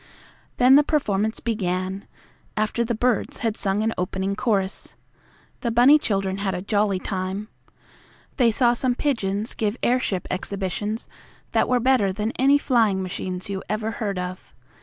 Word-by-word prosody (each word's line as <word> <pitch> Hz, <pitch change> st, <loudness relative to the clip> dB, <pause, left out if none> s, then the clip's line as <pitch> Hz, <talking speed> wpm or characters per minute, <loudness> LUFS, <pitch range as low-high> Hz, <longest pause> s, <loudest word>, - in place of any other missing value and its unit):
Then 260 Hz, +2 st, +7 dB
the 295 Hz, -, +6 dB
performance 220 Hz, -8 st, 0 dB
began, 190 Hz, -3 st, -2 dB, 0.5 s
after 215 Hz, +2 st, 0 dB
the 235 Hz, 0 st, -2 dB
birds 245 Hz, 0 st, 0 dB
had 220 Hz, -2 st, 0 dB
sung 200 Hz, 0 st, -1 dB
an 225 Hz, +1 st, 0 dB
opening 190 Hz, +2 st, -2 dB
chorus. 195 Hz, -4 st, -1 dB, 0.6 s
The 240 Hz, -, -2 dB
bunny 250 Hz, +6 st, +6 dB
children 195 Hz, -5 st, -1 dB
had 195 Hz, -2 st, -2 dB
a 180 Hz, -, -4 dB
jolly 205 Hz, -1 st, +1 dB
time. 190 Hz, +3 st, -4 dB, 0.9 s
They 245 Hz, -3 st, +4 dB
saw 240 Hz, +1 st, +4 dB
some 245 Hz, 0 st, +2 dB
pigeons 220 Hz, -7 st, -1 dB
give 215 Hz, +1 st, -2 dB
airship 240 Hz, -7 st, +1 dB
exhibitions 200 Hz, +3 st, -3 dB, 0.4 s
that -, -, +2 dB
were 250 Hz, -1 st, +3 dB
better 245 Hz, -5 st, +3 dB
than 210 Hz, +4 st, -2 dB
any 275 Hz, +2 st, +5 dB
flying 225 Hz, -9 st, +2 dB
machines 185 Hz, 0 st, -5 dB
you 195 Hz, -1 st, -4 dB
ever 215 Hz, +1 st, -1 dB
heard 205 Hz, -3 st, -3 dB
of. 180 Hz, 0 st, -6 dB
210 Hz, 150 wpm, -23 LUFS, 195-240 Hz, 0.9 s, Then